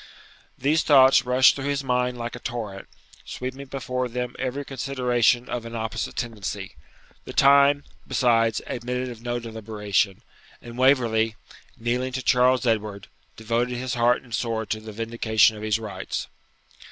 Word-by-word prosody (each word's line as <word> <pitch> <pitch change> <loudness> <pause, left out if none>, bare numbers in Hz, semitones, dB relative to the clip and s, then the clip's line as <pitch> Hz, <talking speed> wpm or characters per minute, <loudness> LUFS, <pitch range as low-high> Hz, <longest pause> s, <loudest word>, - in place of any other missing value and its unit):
These 150 +5 +2
thoughts 135 -3 +6
rushed 130 +3 +5
through 140 - -5
his 140 -1 -1
mind 125 -1 0
like 120 0 -5
a - - -8
torrent, 110 -6 -6 0.4
sweeping 130 +2 -6
before 125 -1 -3
them 125 +1 -4
every 130 +2 -3
consideration 125 -2 +1
of 120 - -4
an 115 0 -8
opposite 110 0 -3
tendency, 105 - -5 0.5
the - - -8
time, 140 +1 +5 0.2
besides, 115 -3 +2
admitted 125 +1 -3
of 115 -2 -9
no 120 0 -2
deliberation, 105 -4 -2 0.4
and 120 -1 -11
Waverley, 120 -4 +3 0.4
kneeling 125 +2 -2
to 130 0 -3
Charles 125 0 +3
Edward, 105 -4 -1 0.3
devoted 120 +2 -1
his 130 0 -3
heart 120 0 +2
and 120 -3 -13
sword 110 -2 -2
to 110 - -1
the 110 0 -9
vindication 110 0 +2
of 105 - -9
his 110 0 +1
rights! 110 -2 -5
120 Hz, 150 wpm, -24 LUFS, 110-130 Hz, 0.5 s, thoughts